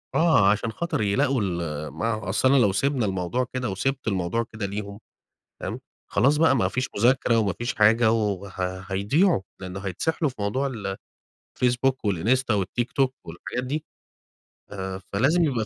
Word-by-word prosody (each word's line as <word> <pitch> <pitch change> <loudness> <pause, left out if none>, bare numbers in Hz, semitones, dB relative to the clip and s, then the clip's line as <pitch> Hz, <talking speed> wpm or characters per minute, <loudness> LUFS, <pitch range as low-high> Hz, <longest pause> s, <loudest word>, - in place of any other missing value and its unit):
آه، 160 -12 +5
عشان 105 +2 -1
خاطر 170 0 -2
يلاقوا 110 +5 +2
ال 85 -6 -3
ما 115 +7 -2
هو 110 -3 -5
أصل 110 +6 +3
أنا 140 - +5
لو 105 -6 +4
سيبنا 130 +4 +1
الموضوع 95 +6 -1
كده 125 -2 -2
وسيبت 135 +8 -2
الموضوع 95 +2 0
كده 110 -2 -3
ليهم 100 0 -5 0.6
فاهم؟ - - -4 0.3
خلاص 135 +9 +3
بقى 155 -3 +4
ما 95 -7 +2
فيش 130 +6 -2
مذاكرة 120 +1 +3
وما 105 -4 +1
فيش 120 +7 -3
حاجة 110 +2 +5
وه 100 -3 -1 0.4
هيضيعوا، 105 - +2 0.2
لأنه 95 +1 -6
هيتسحلوا 140 - -1
في - - -15
موضوع 105 +7 0
ال 105 -7 -4 0.7
الfacebook 125 +2 +3 0.2
والinsta 110 +4 +1
والTiktok 125 +7 0
والحاجات 85 +9 -5
دي. 150 +4 -3 0.8
ف - - -10 0.4
فلازم 145 - +3
يبقى 125 -8 0
110 Hz, 155 wpm, -25 LUFS, 100-130 Hz, 0.8 s, آه